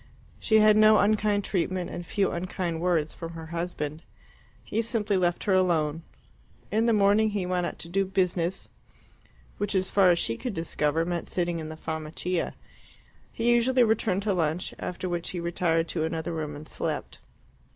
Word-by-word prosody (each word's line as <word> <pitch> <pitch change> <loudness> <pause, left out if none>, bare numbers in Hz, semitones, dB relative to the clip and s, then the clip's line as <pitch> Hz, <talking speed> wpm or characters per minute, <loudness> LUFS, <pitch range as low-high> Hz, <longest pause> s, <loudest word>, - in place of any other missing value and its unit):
She 220 - +3
had 215 0 +6
no 215 0 +7
unkind 210 -1 +2
treatment, 185 -1 -1
and 175 - -5
few 195 +3 0
unkind 170 -1 -3
words, 170 -4 +1
from 165 -1 -7
her 165 -1 -8
husband. 165 -3 -3 0.6
He 225 - -1
simply 220 -3 -1
left 175 -2 +1
her 200 - +2
alone. 165 -4 +2 0.7
In 225 +2 +2
the - - +4
morning 210 +1 +4
he 205 -3 -2
went 180 -1 0
out - - -7
to - - -6
do 195 +3 +1
"business," 185 -1 -1 0.9
which, 205 0 -1
as 185 0 +1
far 195 -2 +5
as 175 - +4
she 115 -8 -1
could 245 -6 -4
discover, 165 -1 0
meant 175 -1 -3
sitting 175 -2 -1
in 155 -1 -6
the 155 - -8
Farmacia. 160 +3 -3 0.8
He 235 +1 +2
usually 245 +1 +4
returned 215 -3 +1
to 205 -1 +1
lunch, 165 -1 -1
after 180 +1 -4
which 175 -1 -2
he 180 - -4
retired 170 -1 0
to 160 - -1
another 160 +1 -3
room 155 -2 -4
and 150 +1 -9
slept. - - -4
180 Hz, 175 wpm, -27 LUFS, 165-205 Hz, 0.9 s, no